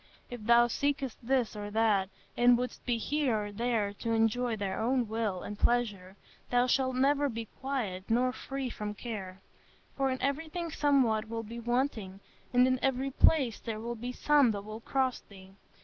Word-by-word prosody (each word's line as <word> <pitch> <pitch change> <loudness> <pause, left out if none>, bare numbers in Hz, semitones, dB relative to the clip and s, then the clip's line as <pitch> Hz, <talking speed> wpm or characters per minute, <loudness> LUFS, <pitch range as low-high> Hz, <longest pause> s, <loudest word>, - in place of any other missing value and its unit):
If 245 -3 -7
thou 235 +2 +6
seekest 275 0 -1
this 250 -2 0
or 205 0 -5
that, 205 -3 +2 0.3
and 245 0 +5
wouldst 250 0 -4
be 240 -1 +2
here 245 -4 0
or 205 - -7
there 220 -2 -1
to 230 - -1
enjoy 225 +1 +1
thy 200 -2 -3
own 245 +3 0
will 215 -4 -2
and 210 - -7
pleasure, 205 -6 0 0.3
thou 245 0 +3
shalt 260 0 +1
never 280 +2 +2
be 230 -2 -5
quiet 230 -9 -3
nor 250 +2 +2
free 270 -2 -5
from 210 -1 -5
care; 195 -4 -6 0.5
for 270 -1 +1
in 260 0 -2
everything 320 +5 -2
somewhat 250 -8 +2
will 225 0 -3
be 230 +2 -8
wanting, 235 -5 -1 0.3
and 250 0 +5
in 255 0 +2
every 270 0 0
place 265 -5 +3
there 220 -2 -5
will 235 +2 -4
be 240 +2 -5
some 285 0 +4
that 200 -1 -5
will 215 +1 -7
cross 260 +1 0
thee.... 190 -1 -16
240 Hz, 180 wpm, -30 LUFS, 215-260 Hz, 0.5 s, thou